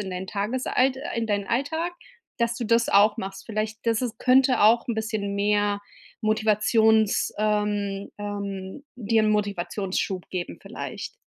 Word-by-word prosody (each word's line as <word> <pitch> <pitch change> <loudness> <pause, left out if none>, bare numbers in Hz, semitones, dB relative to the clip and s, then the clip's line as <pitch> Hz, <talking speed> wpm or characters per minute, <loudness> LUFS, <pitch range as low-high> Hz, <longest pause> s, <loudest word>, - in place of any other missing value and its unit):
in 195 -2 -5
dein 185 +1 -5
Tagesalt 255 +5 0 0.2
in 230 -1 -1
deinen 205 -2 -1
Alltag, 320 +8 -1 0.4
dass 235 -1 0
du 240 - -4
das 230 +1 +2
auch 205 +1 +5
machst. 195 -2 -6
Vielleicht, 215 0 -3
dass 225 +1 +2
es 240 -3 -3
könnte 260 +1 +4
auch 225 +3 +5
'n 235 - 0
bisschen 215 -2 -2
mehr 205 0 +1 0.4
Motivations 215 0 +3
ähm, 205 -2 -1
ähm, 200 +2 -5
dir 225 -1 +2
'n 215 - +2
Motivationsschub 195 -2 -2
geben 180 -2 -4
vielleicht. - - -7
215 Hz, 145 wpm, -25 LUFS, 200-230 Hz, 0.4 s, auch